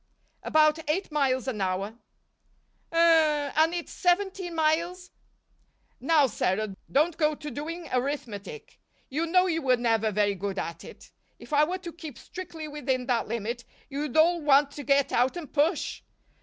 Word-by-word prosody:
"About 305 Hz, 0 st, +3 dB
eight 345 Hz, +3 st, -1 dB
miles 270 Hz, -4 st, +1 dB
an 225 Hz, -6 st, -2 dB
hour." 190 Hz, +1 st, -1 dB, 1.0 s
"Hum 320 Hz, -3 st, +4 dB
and 320 Hz, +2 st, +4 dB
it's 345 Hz, -, -5 dB
seventeen 370 Hz, -1 st, 0 dB
miles 335 Hz, +3 st, 0 dB, 0.5 s
" -, -, -41 dB, 0.3 s
"Now, 295 Hz, +2 st, +4 dB
Sarah, 205 Hz, -3 st, -1 dB, 0.2 s
don't 310 Hz, +4 st, +2 dB
go 305 Hz, -2 st, +2 dB
to 295 Hz, 0 st, -7 dB
doing 330 Hz, +3 st, -6 dB
arithmetic 250 Hz, -, -4 dB, 0.3 s
you 315 Hz, +5 st, -1 dB
know 365 Hz, +2 st, +4 dB
you 330 Hz, -3 st, 0 dB
were 255 Hz, -3 st, +3 dB
never 225 Hz, -2 st, +1 dB
very 205 Hz, 0 st, +2 dB
good 195 Hz, +1 st, -4 dB
at 170 Hz, -1 st, -4 dB
it. -, -, -13 dB, 0.3 s
If -, -, -11 dB
I 295 Hz, +1 st, +5 dB
were 360 Hz, +4 st, -3 dB
to 350 Hz, -3 st, -9 dB
keep 315 Hz, -7 st, -9 dB
strictly 330 Hz, -4 st, -8 dB
within 265 Hz, -4 st, -2 dB
that 245 Hz, -3 st, 0 dB
limit 235 Hz, +2 st, -3 dB, 0.3 s
you'd 285 Hz, 0 st, -3 dB
all 340 Hz, +2 st, +4 dB
want 285 Hz, -1 st, +4 dB
to 290 Hz, 0 st, -8 dB
get 275 Hz, +1 st, +2 dB
out 255 Hz, +7 st, +2 dB
and 310 Hz, -6 st, -8 dB
push. 305 Hz, +3 st, 0 dB
295 Hz, 160 wpm, -27 LUFS, 250-330 Hz, 1.0 s, I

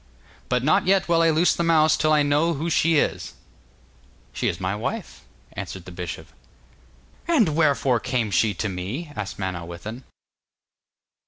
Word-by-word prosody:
'But 125 Hz, -1 st, +1 dB
not 155 Hz, +5 st, +2 dB
yet 195 Hz, 0 st, +3 dB
will 170 Hz, -1 st, +3 dB
I 165 Hz, -, +4 dB
loose 160 Hz, +3 st, +3 dB
the -, -, -3 dB
mouse 160 Hz, -2 st, +4 dB
till 155 Hz, -, +1 dB
I 150 Hz, -1 st, +4 dB
know 150 Hz, +4 st, +2 dB
who 165 Hz, +4 st, -3 dB
she 165 Hz, +2 st, +3 dB
is.' -, -, -1 dB, 1.0 s
'She -, -, -2 dB
is -, -, -2 dB
my 95 Hz, +1 st, -2 dB
wife,' 105 Hz, -, -5 dB, 0.3 s
answered 95 Hz, -2 st, -7 dB
the 90 Hz, -, -10 dB
bishop. 85 Hz, -1 st, -7 dB, 1.0 s
'And 285 Hz, -, +3 dB
wherefore 140 Hz, -6 st, +2 dB
came 115 Hz, -3 st, -2 dB
she 100 Hz, +2 st, +2 dB
to 105 Hz, -, -2 dB
me?' 100 Hz, -, -5 dB
asked 105 Hz, -2 st, -5 dB
Manawyddan. 95 Hz, +5 st, -6 dB
135 Hz, 155 wpm, -23 LUFS, 100-160 Hz, 1.0 s, I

